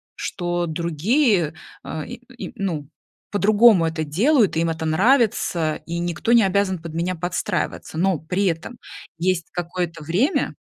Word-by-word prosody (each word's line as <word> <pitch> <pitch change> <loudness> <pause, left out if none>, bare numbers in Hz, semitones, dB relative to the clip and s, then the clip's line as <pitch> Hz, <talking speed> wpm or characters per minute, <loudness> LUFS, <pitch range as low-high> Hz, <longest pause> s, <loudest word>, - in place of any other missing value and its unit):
что 175 -1 -2
другие, 170 - +1 0.3
э, 155 -1 -5
и 245 +2 -11
и - - -8
ну, 165 -8 -3 0.4
по-другому 205 -2 +5
это 160 -1 -2
делают, 215 - +3
им 165 +1 +1
это 160 0 -3
нравится, 180 - +2
и 170 +1 -3
никто 175 +6 -2
не 235 -3 +6
обязан 190 -1 +1
под 165 -2 -8
меня 175 +2 -1
подстраиваться, 175 -1 -3
но 185 0 +2
при 180 +6 -1
этом 175 +7 -2 0.4
есть 175 -1 0
какое-то 170 -2 -4
время 210 - +1
175 Hz, 140 wpm, -22 LUFS, 165-205 Hz, 0.4 s, не